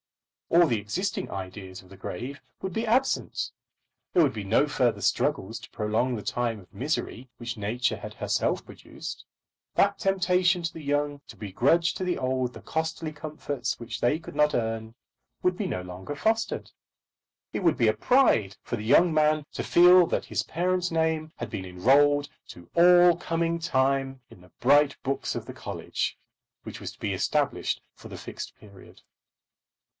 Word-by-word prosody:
All 170 +1 +6
the 115 -6 +1
existing 180 - -3
ideas 95 0 -7
of 90 - -20
the 95 - -12
grave 125 +8 -6 0.2
would 190 -1 -4
be 225 +3 -2
absent. 260 +4 +1 0.6
There 175 - +5
would 140 - +2
be 105 -2 -5
no 115 +9 +3
further 125 -4 +1
struggles 110 +4 0
to 115 - -13
prolong 110 +4 0
the 105 - -6
time 120 -3 -1
of 90 - -18
misery 130 -2 -3
which 120 -1 -5
nature 110 +4 -1
had - - -9
herself - - 0
produced. - - -9 0.5
That 200 0 +3
temptation 180 -1 +2
to 165 0 -2
the 160 - -8
young 145 0 -1
to - - -12
begrudge 135 - +2
to - - -4
the 180 -1 0
old 130 -1 -1
the - - -10
costly 160 0 -3
comforts 145 -4 -4
which 120 -1 -6
they 120 +6 +3
could 160 - -11
not 150 0 +3
earn 110 -1 -2 0.5
would 180 0 +2
be 195 +1 -2
no 90 - -3
longer 90 +9 -7
fostered. 225 +7 -1 0.8
It - - -2
would 165 -6 +3
be 120 -4 +3
a 110 - +4
pride 110 - +3
for - - -3
the 105 - -6
young 160 +9 +5
man 155 -1 +3
to - - -3
feel 180 0 +7
that - - -1
his - - -1
parent's 180 +1 -1
name 160 -1 0
had 120 - -5
been 95 - -4
enrolled 140 +11 +3 0.2
to 85 -1 -12
all 175 0 +7
coming 170 0 -1
time 135 -4 +1
in 90 - -16
the 90 - -19
bright 145 +3 +4
books 135 0 -2
of - - -4
the - - -8
college - - -4 0.5
which - - -8
was - - -5
to - - -20
be - - -2
established - - 0
for - - -13
the - - -8
Fixed - - -8
Period. 100 -3 -16
145 Hz, 175 wpm, -27 LUFS, 115-170 Hz, 0.8 s, feel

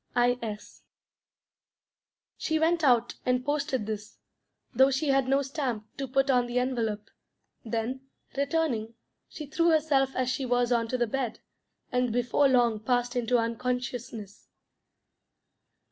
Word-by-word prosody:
I. 245 0 +3
S." 210 -2 -7 1.5
She 315 - -1
went 330 +1 +2
out 240 -4 +3
and 250 0 0
posted 285 -5 -1
this, 215 0 -6 0.6
though 265 +2 +5
she 275 +2 0
had 270 -1 +3
no 275 +1 +2
stamp 255 -6 -4
to 275 - -3
put 270 +2 +2
on 245 -1 +3
the 240 +1 -2
envelope; 230 -5 -1 0.5
then, 235 +4 -3 0.3
returning, 275 -6 -1 0.3
she 305 - -7
threw 335 +4 +1
herself 290 -4 +2
as 255 -1 0
she 255 +2 -1
was 245 -1 +1
on 230 -1 +2
to 255 - -1
the 240 - +2
bed, 245 0 -3 0.5
and 250 -2 +1
before 245 +4 +2
long 240 -4 +3
passed 245 +2 0
into 245 0 +2
unconsciousness. 235 -2 -3
250 Hz, 135 wpm, -28 LUFS, 235-270 Hz, 1.5 s, though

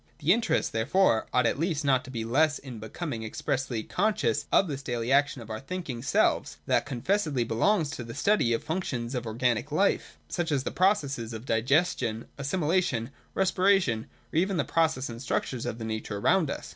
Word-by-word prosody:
The 165 +3 +4
interest, 225 0 0
therefore, 115 - +2
ought 125 -1 +3
at 115 - +1
least 160 -3 -1
not 130 -2 +3
to - - -10
be 115 -3 -4
less 145 +6 +3
in 125 -5 -9
becoming 115 +2 -5
expressly 125 0 -2
conscious 180 - 0
of 195 - +4
this 140 -3 -4
daily 120 -2 -2
action 140 -3 +2
of 110 - -10
our 110 - -4
thinking 135 -5 -5
selves, 130 - +1
than - - +3
confessedly 145 - 0
belongs 145 - +1
to 120 - -5
the 115 0 -8
study 170 - +2
of 115 - +1
the - - -21
functions 140 -8 -3
of 120 -3 -3
organic 120 +4 0
life, 195 +7 +1
such 175 -2 -2
as 135 -3 +1
the - - -3
pro 190 +3 +4
cesses 135 - -5
of 110 +2 -7
digestion, 120 -1 +1
assimilation, 145 -5 0 0.2
respiration, 185 - +2 0.3
or - - 0
even 190 +2 +2
the - - +2
processes 160 -6 +1
and 115 +1 -8
structures 130 -2 -2
of 115 - -3
the 115 - -5
nature 110 -1 -4
around 165 - +3
us. - - -5
135 Hz, 195 wpm, -28 LUFS, 115-165 Hz, 0.3 s, The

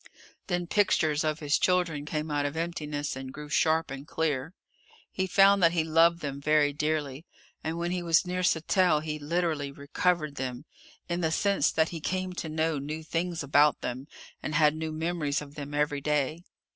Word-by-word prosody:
Then 175 -1 -1
pictures 160 -6 +2
of 155 0 -1
his 145 0 +2
children 175 -5 +1
came 150 0 -3
out 145 -1 +1
of 145 - -6
emptiness 150 -4 -3
and 130 0 -7
grew 150 +1 -9
sharp 160 0 +2
and 140 +1 -7
clear. 160 +1 -2 0.6
He 190 0 -1
found 195 +1 +5
that 170 -1 +5
he 165 -2 +2
loved 165 +2 +3
them 140 -1 -5
very 150 -1 +3
dearly. 150 0 -2 0.4
And 160 +1 -3
when 170 +1 -2
he 180 0 -1
was 170 +1 +3
near 180 0 -2
Sattell 175 -1 +2
he 155 -1 -4
literally 155 -2 -1
recovered 150 +2 -1
them 130 +1 -4 0.4
in 175 0 -2
the 160 - +1
sense 195 -2 +2
that 160 0 +2
he 165 -2 -6
came 185 +2 -2
to 165 -2 -5
know 160 -1 0
new 155 +3 -5
things 165 0 -2
about 145 +1 +4
them 130 +3 -5 0.3
and 155 - -3
had 150 -1 +5
new 160 0 -4
memories 155 -2 -1
of 145 -1 -10
them 145 -1 -7
every 145 -1 0
day. 150 +3 -1
155 Hz, 185 wpm, -28 LUFS, 145-170 Hz, 0.6 s, found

